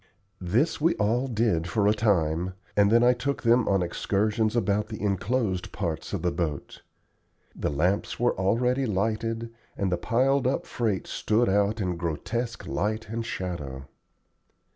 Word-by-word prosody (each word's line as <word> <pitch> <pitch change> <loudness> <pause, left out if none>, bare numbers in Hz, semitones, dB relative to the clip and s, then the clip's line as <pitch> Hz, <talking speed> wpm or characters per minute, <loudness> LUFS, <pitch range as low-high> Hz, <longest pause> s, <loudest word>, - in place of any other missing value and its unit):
This 120 - 0
we 165 +3 +3
all 115 +6 +1
did 110 -9 +1
for 100 +3 +1
a 105 - +5
time, 90 -4 +1 0.2
and 100 -1 +5
then 115 +1 +5
I 125 +1 +6
took 135 +3 -3
them 115 0 +4
on 95 -2 +2
excursions 105 +5 0
about 105 -1 +1
the 110 -1 -7
enclosed 100 -1 -1
parts 85 -6 -3
of - - -3
the 90 - +2
boat. 80 -5 -4 0.7
The - - -1
lamps 90 +8 0
were 120 0 +2
already 125 +7 +1
lighted, 115 +3 -1 0.2
and 100 -2 0
the 90 - +1
piled 130 +6 +2
up 135 - 0
freight 110 -6 -1
stood 115 +3 +1
out 100 +3 +2
in 90 -4 -1
grotesque 105 +8 -3
light 110 +4 -2
and 115 +1 -3
shadow. 75 -11 -5
105 Hz, 155 wpm, -27 LUFS, 90-115 Hz, 0.7 s, I